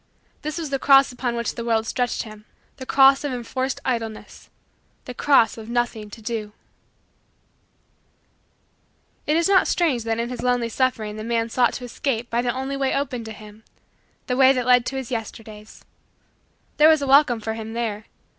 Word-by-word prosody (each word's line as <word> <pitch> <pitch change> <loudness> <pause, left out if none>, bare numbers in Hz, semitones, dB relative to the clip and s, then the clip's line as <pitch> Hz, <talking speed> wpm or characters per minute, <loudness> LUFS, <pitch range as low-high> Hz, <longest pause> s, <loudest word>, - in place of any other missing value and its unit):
This 305 +2 -4
was 320 -4 -5
the 275 - -1
cross 275 -1 +5
upon 245 -1 -3
which 235 0 -2
the 235 - -6
world 225 -1 0
stretched 245 +2 -2
him 215 -2 -12 0.3
the 260 -2 -9
cross 270 0 +5
of 290 - -2
enforced 255 +2 -3
idleness 225 -4 -5 0.6
the 250 - -7
cross 240 -4 +3
of 220 0 -10
nothing 235 -3 -2
to 220 +2 -12
do. 215 -2 -4 2.7
It 300 - +2
is 335 - +2
not 390 -1 +4
strange 295 -10 +1
that 225 0 -1
in 235 +1 -2
his 250 - -6
lonely 245 -2 0
suffering 220 -4 -1
the 215 - -6
man 230 0 -1
sought 245 +1 +2
to - - -6
escape 240 -1 -3
by 235 +1 +1
the 240 0 0
only 265 +2 -4
way 270 -1 0
open 255 -4 -2
to 220 - -7
him 215 0 -13 0.6
the 250 - -1
way 265 0 +6
that 250 -2 -2
led 250 -1 +4
to 270 - -4
his 265 -2 -5
Yesterdays. 220 -2 -8 0.9
There 305 +1 +7
was 315 -3 +3
a - - -2
welcome 270 -3 +5
for 220 0 -4
him 225 0 -7
there. 220 -2 -3
240 Hz, 185 wpm, -23 LUFS, 225-265 Hz, 2.7 s, There